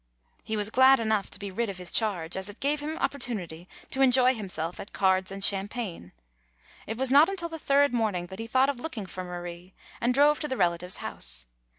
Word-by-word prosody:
He 220 Hz, -, -3 dB
was 210 Hz, +1 st, 0 dB
glad 260 Hz, +2 st, +6 dB
enough 220 Hz, -3 st, 0 dB
to -, -, -4 dB
be 200 Hz, -1 st, -6 dB
rid 230 Hz, +3 st, -2 dB
of 195 Hz, -, -6 dB
his 180 Hz, -1 st, -2 dB
charge, 180 Hz, -7 st, +1 dB
as 190 Hz, +1 st, -3 dB
it 205 Hz, -, -11 dB
gave 290 Hz, +2 st, 0 dB
him 305 Hz, +2 st, -4 dB
opportunity 195 Hz, -, -3 dB, 0.2 s
to 265 Hz, -, -1 dB
enjoy 255 Hz, -1 st, +6 dB
himself 180 Hz, -7 st, -5 dB
at 200 Hz, -, -9 dB
cards 190 Hz, -1 st, +2 dB
and 195 Hz, 0 st, +2 dB
champagne. 195 Hz, -, -2 dB, 0.8 s
It 220 Hz, -, -4 dB
was 260 Hz, 0 st, +1 dB
not 290 Hz, +6 st, +7 dB
until 360 Hz, -4 st, -3 dB
the 325 Hz, -1 st, -7 dB
third 285 Hz, -2 st, +3 dB
morning 210 Hz, -7 st, 0 dB
that 190 Hz, -, -9 dB
he 225 Hz, -, -5 dB
thought 260 Hz, +4 st, +3 dB
of 275 Hz, -4 st, -3 dB
looking 245 Hz, -8 st, -5 dB
for 185 Hz, 0 st, -6 dB
Marie, 175 Hz, 0 st, -8 dB, 0.3 s
and 240 Hz, +1 st, +2 dB
drove 290 Hz, +3 st, +4 dB
to 300 Hz, -, -3 dB
the 260 Hz, -, -3 dB
relative's 175 Hz, +1 st, 0 dB
house. -, -, -4 dB
215 Hz, 215 wpm, -27 LUFS, 185-265 Hz, 0.8 s, not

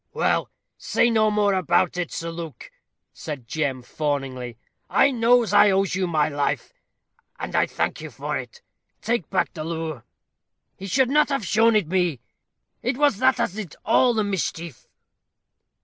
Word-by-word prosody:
"Well, -, -, +1 dB, 0.3 s
say 235 Hz, -, +2 dB
no 215 Hz, -1 st, +3 dB
more 210 Hz, -1 st, +2 dB
about 180 Hz, -1 st, +1 dB
it, 175 Hz, -2 st, -3 dB
Sir 165 Hz, 0 st, -4 dB
Luke," 165 Hz, -7 st, -8 dB, 0.4 s
said 145 Hz, -7 st, -7 dB
Jem, 135 Hz, -2 st, -2 dB
fawningly; 130 Hz, -4 st, -3 dB, 0.3 s
"I 280 Hz, -, +4 dB
knows 240 Hz, -1 st, +3 dB
I 210 Hz, -, +7 dB
owes 195 Hz, 0 st, +1 dB
you 185 Hz, 0 st, 0 dB
my 155 Hz, -3 st, +1 dB
life, 145 Hz, -, -2 dB, 0.6 s
and -, -, -5 dB
I -, -, +3 dB
thank -, -, -2 dB
you -, -, -7 dB
for -, -, -4 dB
it. 480 Hz, -1 st, -7 dB, 0.4 s
Take 230 Hz, -8 st, -1 dB
back 190 Hz, -, 0 dB
the 155 Hz, -, -5 dB
lowre. 160 Hz, -4 st, -4 dB, 0.7 s
He 195 Hz, -, -8 dB
should 260 Hz, +6 st, +2 dB
not 300 Hz, +1 st, +4 dB
have 275 Hz, -7 st, -1 dB
shown 225 Hz, +5 st, +3 dB
it 210 Hz, -4 st, +3 dB
me 175 Hz, -6 st, 0 dB, 0.6 s
it 250 Hz, +2 st, -1 dB
was 290 Hz, -7 st, +3 dB
that 260 Hz, 0 st, +3 dB
as -, -, 0 dB
did 200 Hz, -7 st, -7 dB
all 240 Hz, +2 st, +4 dB
the 215 Hz, -, +1 dB
mischief." 170 Hz, -6 st, -4 dB
185 Hz, 165 wpm, -23 LUFS, 155-230 Hz, 0.7 s, I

